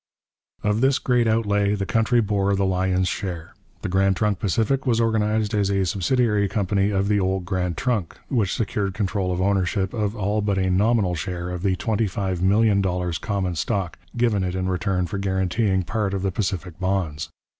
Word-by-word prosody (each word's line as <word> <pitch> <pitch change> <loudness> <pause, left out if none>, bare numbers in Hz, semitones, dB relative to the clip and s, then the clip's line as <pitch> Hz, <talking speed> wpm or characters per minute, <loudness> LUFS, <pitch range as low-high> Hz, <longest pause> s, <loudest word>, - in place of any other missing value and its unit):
Of 105 +1 +1
this 135 0 +4
great 125 -2 +1
outlay 105 -2 +2
the 100 -1 -2
country 115 +5 +2
bore 100 -2 +1
the 100 0 +1
lion's 95 0 +1
share. 85 -3 -4 0.3
The - - -1
Grand 95 +1 +2
Trunk 105 -1 0
Pacific 115 - 0
was 115 -2 +2
organized 110 -1 +1
as 100 -2 +1
a 100 -1 +1
subsidiary 105 +2 +1
company 100 0 0
of 100 -1 0
the 105 0 +2
old 95 -1 -1
Grand 90 -3 -2
Trunk, 110 -9 -1
which 110 -8 0
secured 100 -3 -2
control 100 -3 -1
of 90 - -2
ownership 95 0 0
of 105 -2 -1
all 105 0 0
but 100 -1 0
a 95 -1 +1
nominal 100 -1 +2
share 90 +1 -4
of 90 -1 -4
the 95 -1 +1
$25,000,000 95 -3 +1
common 100 -4 -1
stock, 90 0 -2 0.2
given 115 -5 +2
it 90 0 -2
in 95 0 -1
return 95 -1 0
for 100 +3 -4
guaranteeing 95 +1 0
part 100 +2 -1
of 95 - -3
the 95 - 0
Pacific 90 -3 -3
bonds. 95 -5 -1
100 Hz, 175 wpm, -23 LUFS, 95-105 Hz, 0.3 s, this